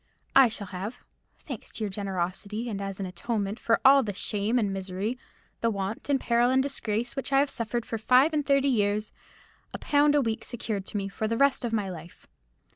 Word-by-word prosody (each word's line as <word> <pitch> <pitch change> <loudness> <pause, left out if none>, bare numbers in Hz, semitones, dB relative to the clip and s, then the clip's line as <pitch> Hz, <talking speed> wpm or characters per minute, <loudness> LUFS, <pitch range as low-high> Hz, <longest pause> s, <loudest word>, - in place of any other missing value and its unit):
I 270 -3 +8
shall 215 -2 -4
have—thanks 210 +6 -9
to 225 - -4
your 205 - -2
generosity, 200 +3 -3
and 200 -3 -4
as 195 -1 -5
an 195 - -2
atonement 200 +3 -3
for 230 - +2
all 275 +1 +8
the 205 -6 -4
shame 210 +3 0
and 205 -5 +1
misery, 195 +4 -3 0.4
the 230 - +1
want, 200 +4 -4
and 280 -1 +3
peril, 240 0 +2
and 260 +1 +3
disgrace, 240 -4 -2
which 270 +1 -4
I 270 - +4
have 280 +1 +3
suffered 235 0 -2
for 225 - -4
five 255 +8 +4
and 300 -1 +1
thirty 275 -1 +3
years—a 210 -4 -3
pound 290 0 +3
a 290 - +4
week 225 -3 -2
secured 215 -5 -4
to - - -4
me 195 -1 -2
for 205 +2 -3
the 230 +1 -1
rest 275 0 +3
of 240 - -2
my 210 -3 0
life. 170 -2 -10
220 Hz, 200 wpm, -27 LUFS, 200-255 Hz, 0.4 s, I